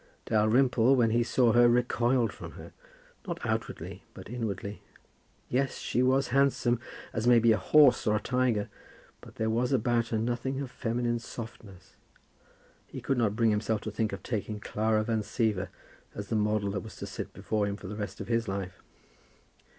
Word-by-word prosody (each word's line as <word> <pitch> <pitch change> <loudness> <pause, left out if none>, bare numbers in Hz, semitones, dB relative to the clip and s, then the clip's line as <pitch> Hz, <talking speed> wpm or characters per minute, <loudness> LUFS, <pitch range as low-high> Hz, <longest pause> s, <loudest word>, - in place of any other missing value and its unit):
Dalrymple, 120 +3 +3
when 115 -3 +3
he 120 +1 +3
saw 120 0 +3
her, 120 0 +6
recoiled 120 0 +2
from - - -9
her, - - -11 0.5
not 170 -2 -3
outwardly, 110 -1 -3
but - - -10
inwardly. 105 -4 -4 0.7
Yes, 135 +1 0
she 125 - -1
was 130 +1 +2
handsome, 130 -2 +2 0.3
as 115 +1 -1
may 120 -1 +7
be 115 0 +5
a 110 - +4
horse 145 +3 +5
or 105 - +3
a - - +1
tiger; 125 -4 0 0.5
but - - -14
there 110 0 0
was 120 +3 0
about 120 -2 +1
her 115 - -1
nothing 120 +4 -2
of 135 -3 -5
feminine 120 0 -1
softness. 110 -5 -10 0.9
He - - -8
could 135 -2 -1
not 105 -3 +1
bring 115 -1 +3
himself 105 0 0
to 110 - -5
think 110 +1 -1
of 100 -1 -7
taking 105 -2 -3
Clara 110 +1 0
Van 110 0 0
Siever 105 -3 -1 0.5
as 100 -1 -6
the 115 - 0
model 105 -1 +1
that 100 - -2
was 110 - -10
to - - -6
sit - - -6
before 105 -2 -1
him 100 - -2
for 100 - -12
the 100 +3 -5
rest 105 -1 -5
of 100 - -6
his 115 -1 0
life. 95 -2 -5
115 Hz, 180 wpm, -29 LUFS, 105-120 Hz, 0.9 s, may